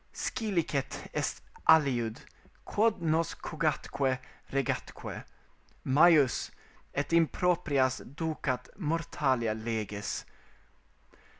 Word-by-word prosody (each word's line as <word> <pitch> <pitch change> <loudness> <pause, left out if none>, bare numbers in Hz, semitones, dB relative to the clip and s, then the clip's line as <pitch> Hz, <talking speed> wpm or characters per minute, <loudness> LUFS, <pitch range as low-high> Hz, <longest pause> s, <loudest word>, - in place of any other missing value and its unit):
Scilicet 180 - -1
est - - -2 0.2
aliud, 125 -8 +4 0.5
quod 210 -4 +1
nos 160 +1 +1
cogatque 140 -4 -1 0.3
regatque 135 -2 -3 0.6
Majus, 145 -1 +5 0.5
et 145 +4 -1
in 165 -1 +6
proprias 145 -8 +1
ducat 145 -6 -2
mortalia 145 - 0
leges." 110 -2 -3
145 Hz, 75 wpm, -30 LUFS, 130-165 Hz, 0.6 s, in